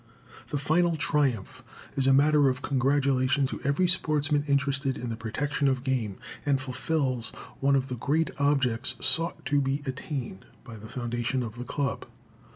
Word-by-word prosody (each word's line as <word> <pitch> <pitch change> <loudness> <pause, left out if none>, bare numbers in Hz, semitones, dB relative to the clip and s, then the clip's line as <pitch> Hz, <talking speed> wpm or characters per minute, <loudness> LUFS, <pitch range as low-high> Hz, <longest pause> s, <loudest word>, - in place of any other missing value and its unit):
The 145 - -2
final 165 +4 +2
triumph 140 -9 0 0.3
is 135 -1 +1
a - - +6
matter 145 +1 +5
of 130 0 -3
congratulation 135 0 +2
to - - -5
every 140 +7 +2
sportsman 150 -4 +2
interested 140 -1 +1
in 125 - -5
the 115 - -3
protection 140 +6 -1
of 130 -1 0
game, 120 -7 -1 0.3
and 140 -2 +2
fulfills 130 -2 -1 0.3
one 140 +1 +3
of 135 -1 +1
the 125 -2 -4
great 150 +5 0
objects 130 -4 +2
sought 165 +1 +1
to 145 -1 +2
be 135 +2 -1
attained 130 - -5 0.2
by 115 -4 -10
the 110 +1 -11
foundation 120 +1 -2
of 115 0 -7
the 125 - -5
Club. 140 +1 -2
135 Hz, 160 wpm, -27 LUFS, 125-145 Hz, 0.3 s, a